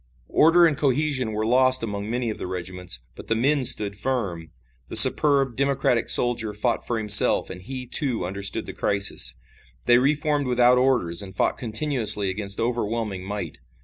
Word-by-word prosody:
Order 170 +2 +4
and 160 -3 +1
cohesion 140 -3 -1
were 110 0 -4
lost 130 +1 +2
among 105 -1 -6
many 120 -1 -3
of - - -10
the - - -6
regiments, 90 -7 -5
but - - -13
the 115 - -1
men 135 +4 0
stood 105 -4 0
firm. 100 -9 -5 0.4
The - - -9
superb, 140 -4 +5
democratic 135 -3 -1
soldier 115 -4 +2
fought 120 +3 -1
for 120 - -1
himself 105 -2 +5
and 90 - -10
he, 130 +6 -8
too, 125 - 0
understood 100 +2 -5
the - - -9
crisis. 100 0 -1 0.5
They 120 0 +4
re 140 +4 +1
formed 150 -2 -3
without 125 0 +2
orders 125 -11 0
and 95 -1 -10
fought - - -1
continuously 110 -5 +2
against 100 0 -4
overwhelming 115 -4 -4
might. 100 -6 -7
115 Hz, 170 wpm, -22 LUFS, 100-130 Hz, 0.5 s, superb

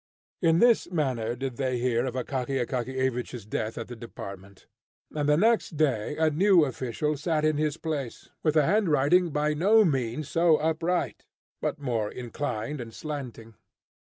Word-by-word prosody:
In 165 -2 +4
this 235 +4 +4
manner 130 -9 -1
did 130 -1 -5
they 130 -2 0
hear 120 0 0
of 125 - -4
Akaky 130 +1 -2
Akakiyevich's 125 -2 -2
death 110 +1 -3
at 115 - -5
the 120 - -8
department. 100 -4 -10 0.5
And 150 -1 0
the 150 - +5
next 220 -4 +2
day 145 -3 0
a 160 -1 +3
new 180 +1 +5
official 135 +3 -2
sat 155 +1 0
in 155 -1 +2
his 155 0 0
place, 145 -8 -5
with 155 -1 +1
a 150 - +5
handwriting 175 -3 +3
by 150 0 0
no 205 +8 +5
means 135 -2 -1
so 165 -2 +4
upright, 165 +3 -1 0.3
but - - -1
more 120 -7 -2
inclined 125 +1 -4
and 115 -1 -8
slanting. 125 -5 -7
145 Hz, 155 wpm, -27 LUFS, 120-155 Hz, 0.5 s, the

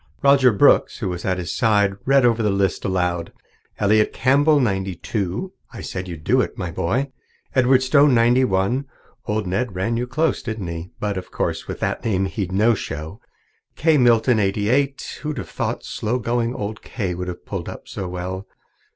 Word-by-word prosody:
Roger 140 -2 +6
Brooks, 100 - +4
who - - -3
was 90 -1 -5
at 95 -1 0
his 85 -3 -4
side, 105 -4 +3
read 135 -1 +5
over 115 -1 +3
the 105 - +2
list 100 -1 0
aloud: 90 -3 -1 0.5
"'Elliott 105 +1 +3
H. - - -20
Campbell, 145 +4 +4
ninety 95 -6 0
two.' 100 - -3 0.2
I - - -8
said 90 0 -5
you'd 85 -3 -8
do 125 +9 +3
it, - - -4
my 90 -3 -4
boy. 120 - -1 0.4
'Edward 130 0 +4
Stone, 140 0 +5
ninety 120 +2 +4
one' 110 +6 0 0.4
old 105 0 -1
Ned 95 +3 -2
ran 115 +6 -1
you 125 +1 -2
close, 155 +5 0
didn't 110 -4 -5
he? 85 +1 -6
But 105 -2 -2
of 90 - -11
course - - -3
with - - -5
that - - -2
name 95 -4 +1
he'd 95 0 -3
no 105 +5 +3
show. 80 -1 -6 0.5
'Kay 155 -1 +3
Milton, 120 -1 +4
eighty 100 +1 0
eight.' 140 +2 0
Who'd 150 -1 -4
have - - -6
thought - - -3
slow 120 +4 -2
going 120 +1 -1
old 105 +2 -5
Kay 100 -7 -3
would 90 +1 -5
have 90 -1 -7
pulled - - -5
up - - -10
so 95 - -5
well? 90 +2 -5
105 Hz, 195 wpm, -22 LUFS, 95-125 Hz, 0.5 s, Roger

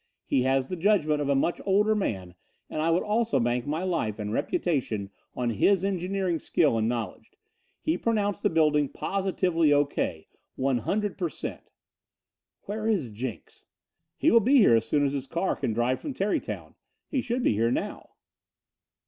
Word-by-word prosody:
He 130 - +1
has 130 0 +1
the 185 - -4
judgment 165 -5 +2
of 140 - -1
a 140 - +3
much 155 +5 0
older 205 +2 +3
man 95 - -2 0.4
and 155 - -2
I 160 - +1
would 165 +2 +2
also 215 - +1
bank 120 +2 0
my 155 +4 -1
life 165 - -1
and 105 -1 -4
reputation 130 - -1 0.2
on 120 -1 -1
his 190 - +2
engineering 185 -2 -1
skill 150 -8 +2
and 110 +1 +1
knowledge. 115 -6 -5 0.5
He 165 +3 0
pronounced 210 -3 0
the - - +2
building 150 -3 +2
positively 185 -5 0
O.K. 145 - 0 0.3
100 135 - -1
per 175 -3 0
cent." - - -7 0.9
"Where 215 +2 -4
is 190 - 0
Jenks?" 115 +2 -7 0.5
"He - - +3
will 230 - +7
be 260 +6 +4
here 195 - +6
as 115 0 +1
soon 145 -1 +2
as 140 - 0
his 135 -1 -3
car 170 +6 -1
can - - -2
drive 120 +3 +1
down - - -20
from 290 - -4
Tarrytown. 200 -1 -2 0.3
He 270 - -1
should 245 +1 -2
be - - +3
here 115 +3 +1
now." - - -3
155 Hz, 175 wpm, -27 LUFS, 125-195 Hz, 0.9 s, will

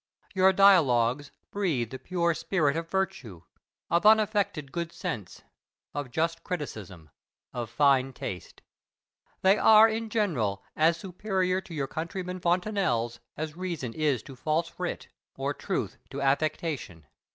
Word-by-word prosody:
Your 190 0 +5
"Dialogues" 145 -9 +4 0.2
breathe 155 - -1
the 130 - -6
pure 170 -2 0
spirit 155 -4 0
of 165 0 -3
virtue, 170 - -3 0.5
of 170 +2 +3
unaffected 205 -8 +3
good 170 0 -3
sense, 105 - -6 0.5
of 145 -3 -4
just 165 +5 -1
criticism, 100 - -6 0.4
of 120 -2 -4
fine 135 0 +3
taste. 95 -7 -7 0.8
They 195 +2 +5
are 220 0 +8
in 225 0 -3
general 125 - 0
as 160 +2 +3
superior 185 0 -1
to 170 - -10
your 140 -3 -1
countryman 180 +5 -5
Fontenelle's 175 - 0 0.2
as 155 0 -4
reason 170 -10 -4
is 145 -5 0
to 135 - -11
false 160 +5 -2
wit, - - -4 0.3
or - - -2
truth - - -3
to - - -6
affectation. 140 - -1
165 Hz, 130 wpm, -28 LUFS, 130-185 Hz, 0.8 s, are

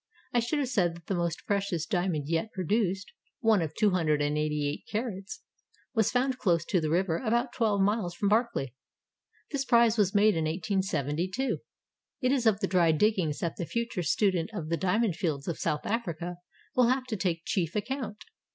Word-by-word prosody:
I 240 - +4
should 240 +6 -1
have 275 -4 0
said 175 -8 +1
that 170 -1 -14
the 195 - -2
most 170 -2 -2
precious 195 -5 0
diamond 175 -6 -1
yet 165 +7 -1
produced, 195 +1 0 0.3
one 220 -4 +4
of 160 -1 -3
288 150 -6 +1
carats, 210 -3 -4 0.5
was 220 -4 +3
found 255 +1 0
close 170 -4 +2
to 180 - +2
the 155 - -1
river 170 0 +1
about 240 +1 0
twelve 210 -4 +1
miles 195 -3 +1
from 200 - 0
Barkly. 215 - +1 0.8
This 280 -2 0
prize 235 -3 +4
was 200 -1 +2
made 210 0 +5
in 160 -1 0
1872. 180 - -1 0.6
It 255 0 +1
is 255 -4 +2
of 215 -1 +3
the - - +1
dry 175 -3 +4
diggings 165 -3 +2
that 170 - -2
the 175 - -3
future 235 -5 -2
student 175 +1 +1
of 160 -7 -4
the 165 - +2
Diamond 190 0 +1
Fields 150 -6 -2
of 170 - -3
South 150 - -1
Africa 175 -6 -3 0.4
will 250 -2 +5
have 255 +1 +2
to 245 -4 -3
take 175 -4 -1
chief 170 -4 -1
account. 225 0 -3
190 Hz, 180 wpm, -29 LUFS, 165-225 Hz, 0.8 s, made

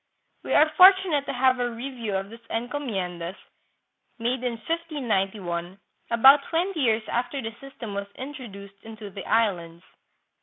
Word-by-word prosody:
We - - -2
are 305 - +6
fortunate 370 -6 +6
to - - -2
have 255 0 +3
a 245 0 0
review 235 -3 -5
of 195 +2 -3
these 230 - -11
encomien 225 -8 -3
das, 170 +3 -5 0.8
made 245 +2 -2
in 245 -1 -1
1591, 210 - -3 0.3
about 265 +5 +7
twenty 345 +1 -1
years 225 -5 +2
after 250 +4 -2
the 225 -3 -5
system 260 -6 -8
was 200 0 -4
introduced 200 -8 -9
into 220 -2 -10
the 195 0 -8
Islands. 175 -6 0
230 Hz, 145 wpm, -25 LUFS, 200-275 Hz, 0.8 s, about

